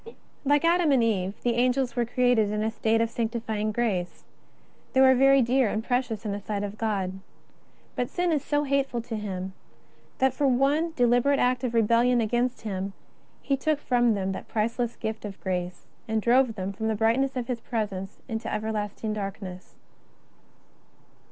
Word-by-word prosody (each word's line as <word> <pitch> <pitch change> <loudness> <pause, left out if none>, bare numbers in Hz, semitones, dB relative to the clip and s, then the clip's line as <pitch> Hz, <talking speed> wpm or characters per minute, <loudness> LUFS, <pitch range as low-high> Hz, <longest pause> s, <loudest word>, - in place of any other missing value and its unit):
Like 290 +2 +3
Adam 340 -2 +3
and 260 -4 +4
Eve, 195 -3 0
the 240 - +2
Angels 250 +1 +1
were 240 -2 0
created 245 -3 +2
in 210 0 -1
a 220 - 0
state 225 0 +1
of 230 - +1
sanctifying 225 -2 -2
grace. 205 -6 -2 0.7
They 265 - +4
were 260 0 +7
very 270 +1 +5
dear 250 -1 +2
and 215 +2 -2
precious 245 -3 -1
in 210 - -1
the 200 - -3
sight 205 0 -3
of 205 0 -4
God. 195 -4 -2 0.8
But 245 - -1
sin 355 -1 0
is 295 -3 0
so 290 0 0
hateful 275 -4 0
to 230 -1 -5
Him, 190 -3 -4 0.6
that 265 -1 +2
for 280 +2 +1
that 250 -2 +3
one 300 +5 +1
deliberate 245 +2 +3
act 250 0 +1
of 240 -2 -2
rebellion 235 +2 +3
against 240 +3 0
Him 195 -2 -4 0.5
He 275 - +1
took 300 +2 0
from 240 -5 +2
them 190 -1 -1
that 190 - -6
priceless 230 +2 -1
gift 220 -1 -5
of 200 -2 -7
grace, 180 -1 -3 0.2
and 220 0 0
drove 240 +1 +3
them 190 0 -4
from 220 +2 -3
the 220 - 0
brightness 235 +5 +1
of 250 -2 -2
His 240 -2 -4
Presence 205 -5 -4
into 225 -2 -4
everlasting 215 0 -3
darkness. 195 -3 -6
230 Hz, 175 wpm, -26 LUFS, 210-255 Hz, 0.8 s, were